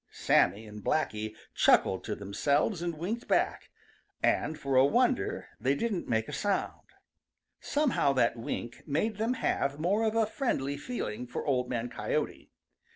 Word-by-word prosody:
Sammy 110 +3 +2
and 105 -1 -10
Blacky 110 -7 -1 0.2
chuckled 95 - +4
to 110 - -2
themselves 140 - 0
and 170 -2 -3
winked 210 +9 -3
back, - - +1 0.5
and 155 - +1
for 135 -1 -2
a 130 - +7
wonder 245 - +1
they 130 +4 +2
didn't 205 +1 -2
make 110 -1 +1
a 150 - -7
sound. 200 +7 -2 0.7
Somehow 285 - +1
that 120 -3 +2
wink 120 0 -5
made 195 +9 0
them 225 +4 0
have 140 - -1
more 195 +7 +1
of 220 0 +1
a 225 -1 +4
friendly 175 - -1
feeling 125 - -4
for 125 - -5
Old 125 -3 +1
Man 120 -1 -2
Coyote. - - -3
140 Hz, 155 wpm, -30 LUFS, -, 0.7 s, a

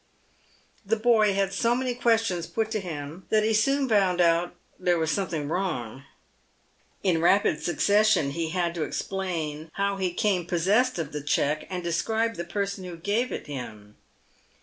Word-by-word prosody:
The 220 +2 +1
boy 215 -3 +3
had 195 -1 0
so 230 +4 +2
many 255 0 -1
questions 225 -8 +1
put 220 -1 -2
to 220 - 0
him 160 -1 -7
that 215 -1 +3
he 220 +1 +2
soon 275 +6 +2
found 195 -5 +2
out 170 0 +2 0.2
there 180 -1 +2
was 160 -1 0
something 165 -7 -2
wrong. 145 - -3 1.0
In 175 -4 +2
rapid 175 -3 +3
succession, 200 -4 +3
he 165 +2 -2
had 175 0 -1
to 170 -2 -2
explain 165 -6 -4
how 200 0 -1
he 185 -2 -1
came 180 -1 0
possessed 200 +9 +2
of 160 -4 -3
the 150 - -4
cheque, 150 +1 0
and 180 -1 -4
describe 220 +7 0
the 170 - -5
person 200 +2 -3
who 175 -2 -7
gave 210 +8 -1
it - - -5
him. 110 -7 -8
185 Hz, 165 wpm, -26 LUFS, 165-215 Hz, 1.0 s, boy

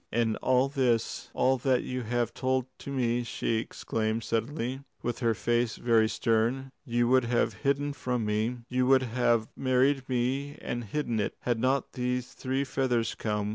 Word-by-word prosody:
"And 115 -1 +1
all 130 +1 +3
this 125 -5 0
all 130 0 +3
that 130 -1 +2
you 125 0 -3
have 120 0 -1
told 130 -1 0
to - - -8
me," 120 -2 +1
she 115 -1 -1
exclaimed 110 0 -2
suddenly, 120 +4 -2 0.2
with 120 -1 -2
her 115 -3 +2
face 120 0 +1
very 115 -2 +3
stern, 120 +4 0
"you 120 -3 +1
would 130 -1 +4
have 120 0 +1
hidden 140 +1 +1
from 125 -4 -2
me? 110 +4 0
You 125 0 +1
would 130 0 +5
have 120 -2 +1
married 130 +1 +2
me 130 +3 -1
and 120 -1 -4
hidden 120 0 -1
it, 105 - -1
had 120 -2 0
not 130 +2 +1
these 125 0 -2
three 130 +1 -1
feathers 125 -4 0
come?" 105 -1 -2
125 Hz, 170 wpm, -29 LUFS, 115-130 Hz, 0.2 s, would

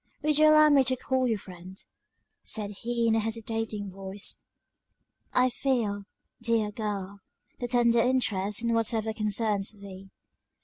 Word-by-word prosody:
"Would 300 0 +3
you 310 - +7
allow 305 0 +7
me 280 -2 +5
to 260 0 +2
call 260 0 0
you 225 -3 0
friend?" 185 -1 -12 0.6
said 210 -2 -2
he 235 0 -1
in 225 - +3
a 225 - +3
hesitating 225 -2 -3
voice. 195 +1 -4 0.9
"I 250 0 +3
feel, 230 -6 -1 0.4
dear 230 -3 0
girl, 200 -2 -5 0.4
the 245 - -3
tendered 235 -1 +3
interest 210 -5 0
in 235 0 +1
whatever 225 -1 +1
concerns 210 -1 0
thee." 195 -2 -12
225 Hz, 140 wpm, -28 LUFS, 205-240 Hz, 0.9 s, you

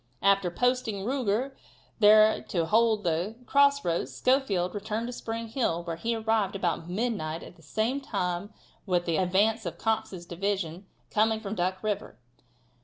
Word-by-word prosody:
After 195 -2 +4
posting 230 -1 0
Ruger 255 0 0 0.5
there 215 0 +6
to 170 -3 0
hold 220 +3 +3
the 175 +5 -1
cross 280 +1 +4
roads 165 -6 -1
Schofield 200 - +1
returned 215 +2 -3
to 245 - -5
Spring 230 -1 -5
Hill, 220 -9 -1
where 170 -1 -4
he 230 +7 -2
arrived 220 -3 0
about 175 -3 -2
midnight 180 -6 -2
at - - -12
the 170 - -20
same 220 - -1
time 190 -5 -2 0.4
with 175 -2 +1
the 165 -2 0
advance 205 +5 +2
of 170 -2 -5
Cox's 200 -5 -2
division 185 0 -3 0.2
coming 220 +1 +2
from 210 -2 -5
Duck 185 0 -2
river. 210 -1 -3
205 Hz, 155 wpm, -28 LUFS, 175-225 Hz, 0.5 s, there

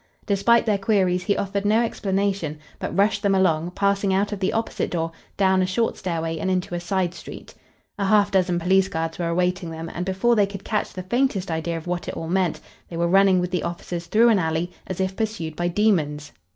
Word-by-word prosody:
Despite 220 +3 +3
their 210 -3 +1
queries 190 -3 +1
he 200 - +1
offered 200 0 -2
no 215 +3 +3
explanation, 195 -7 -1 0.2
but - - -4
rushed 200 +1 +3
them 200 -1 +2
along, 170 -3 +2
passing 200 0 +1
out 200 +2 +1
of 205 - -4
the 190 - 0
opposite 225 0 -2
door, 165 -1 -2 0.3
down 190 -1 +3
a 185 - +1
short 225 +5 0
stairway 165 -3 -3
and 190 - -1
into 180 -1 -1
a 175 - -1
side 180 0 -1
street. - - -10 0.5
A 200 - +1
half 205 0 +4
dozen 185 -2 +2
police 190 +2 +3
guards 165 -1 -3
were 170 - -1
awaiting 180 +1 0
them, 165 0 -6
and 175 - -3
before 190 +6 +2
they 205 -2 +3
could 200 -1 -8
catch 210 -2 -1
the 185 - -6
faintest 200 -3 0
idea 165 +1 -2
of 160 - -8
what 175 0 -3
it - - -5
all 165 - -5
meant, 180 -2 +1 0.3
they 170 - -6
were 170 0 +1
running 195 +1 +5
with 180 0 -2
the 180 - 0
officers 170 0 -5
through 230 +5 +5
an 215 -4 +4
alley, 165 +1 -1 0.2
as 185 - -5
if 190 0 -1
pursued 210 -8 -3
by 175 +2 -1
demons. 160 -7 +1
185 Hz, 220 wpm, -23 LUFS, 170-200 Hz, 0.5 s, running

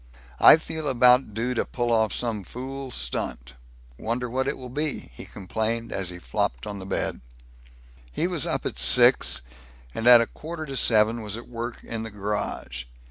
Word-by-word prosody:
"I - - +9
feel 160 -1 -5
about 125 -3 +4
due 120 +3 -1
to 120 - 0
pull 120 -1 -2
off 110 -2 +2
some 115 -4 -3
fool 135 +5 -7
stunt. 60 - -3 0.5
Wonder 120 +2 -2
what 130 +2 -1
it - - -2
will 125 -2 -9
be?" 150 +1 -3
he - - -9
complained, 110 +4 -3
as 95 -3 -1
he 90 - -6
flopped 65 -6 -2
on 100 -1 -6
the 95 - -8
bed. - - -3 0.9
He - - -1
was - - 0
up - - -2
at - - -3
six, 65 0 +5 0.5
and 115 - -2
at 120 -1 +10
a 115 - +2
quarter 160 +4 -7
to 135 -2 -6
seven 115 -1 +3
was 105 0 -5
at 115 - -10
work 120 0 -6
in 115 -1 -5
the 110 - -5
garage. 100 - -4
115 Hz, 185 wpm, -25 LUFS, 105-125 Hz, 0.9 s, at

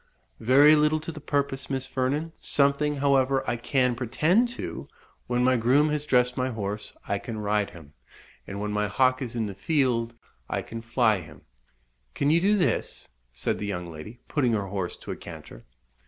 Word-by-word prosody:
"Very 140 +6 +6
little 150 +1 +3
to 160 - -5
the 155 -2 -10
purpose, 140 -2 -2
Miss 135 -1 -1
Vernon; 140 +5 -2
something, 145 +1 +2
however, 135 -1 +2
I 120 - +1
can 125 +1 +1
pretend 150 - +2
to - - -6 0.4
When 125 0 +1
my 130 0 +4
groom 135 +7 +3
has 150 0 -2
dressed 125 -2 +3
my 130 0 0
horse 105 -3 -4
I 100 0 0
can 115 0 -6
ride 105 -1 0
him, 80 -4 -14 0.5
and 100 - -5
when 105 0 -2
my 105 0 0
hawk 130 +5 +2
is 120 -3 -4
in 115 -2 0
the 100 - -5
field, 120 - 0 0.3
I - - -2
can 115 0 -7
fly 115 -3 +2
him." 75 -4 -14 0.7
"Can 140 +1 +2
you 165 +2 +4
do 205 +3 +3
this?" 180 - -1 0.2
said - - -2
the 105 - -3
young 90 -3 -3
lady, 85 +9 -10
putting 130 -6 +1
her 100 -3 -1
horse 95 -3 -3
to - - -8
a - - -3
canter. - - -11
125 Hz, 185 wpm, -26 LUFS, 105-140 Hz, 0.7 s, Very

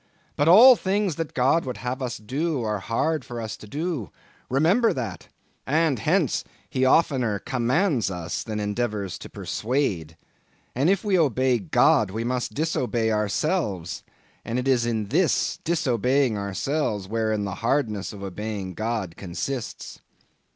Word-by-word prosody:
But 145 - +1
all 225 +10 +10
the - - -6
things 195 -3 0
that 165 -2 -4
God 135 +6 +3
would 125 -2 -5
have 125 +2 -4
us 120 -2 -3
do 135 +5 -2
are 105 -2 -1
hard 140 +8 -1
for 120 -1 -7
us 110 -2 -4
to 105 - -12
do—remember 160 - -1
that—and 130 - -3
hence, 165 - +1 0.2
he 130 - -1
oftener 130 -6 +3
commands 130 - 0
us 90 -3 -4
than 110 -2 -4
endeavors 105 -2 -2
to - - -9
persuade. 100 - -2 0.6
And 140 +7 +2
if 195 0 +2
we 195 -4 +2
obey 130 -4 +2
God, 95 0 +3
we 110 +4 -3
must 125 +1 -2
disobey 125 -7 0
ourselves; 105 - -1 0.4
and 115 - -3
it 125 +1 -1
is 125 -3 +3
in 110 -3 -2
this - - +1
disobeying 130 -5 +1
ourselves, 100 +1 -2
wherein 110 -1 -1
the 100 - -4
hardness 115 -5 0
of 100 -2 -9
obeying 100 0 -5
God 110 -5 -3
consists. 110 +8 -5
120 Hz, 145 wpm, -25 LUFS, 105-150 Hz, 0.6 s, all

